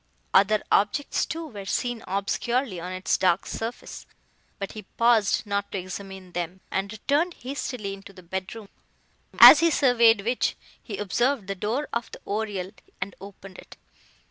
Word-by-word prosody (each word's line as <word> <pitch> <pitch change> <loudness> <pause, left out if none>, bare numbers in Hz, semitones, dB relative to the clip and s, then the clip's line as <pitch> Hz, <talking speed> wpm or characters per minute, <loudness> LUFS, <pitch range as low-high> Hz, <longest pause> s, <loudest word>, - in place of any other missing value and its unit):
Other 205 +2 +4
objects 210 +8 +1
too 330 0 -5
were 205 -10 -9
seen 245 0 -2
obscurely 200 +2 -1
on 180 +2 -6
its 185 +1 -1
dark 180 0 +2
surface, 230 +2 -6 0.5
but 195 -1 -5
he 215 - -8
paused 225 +1 +2
not 200 -1 -2
to - - -3
examine 190 0 -8
them, 175 +1 -5
and 195 +1 -2
returned 290 +10 0
hastily 250 -6 -5
into 195 0 -11
the 185 -2 -15
bedroom, 190 +4 -6 0.7
as 295 - +11
he 335 +1 +4
surveyed 235 -7 +4
which, 240 +2 0 0.3
he 205 -5 -7
observed 235 +5 0
the 195 - -3
door 220 +9 -2
of 235 0 -2
the - - -10
oriel, 200 -3 -3 0.3
and 185 +1 -4
opened 195 -1 -11
it. - - -14
205 Hz, 155 wpm, -25 LUFS, 190-240 Hz, 0.7 s, as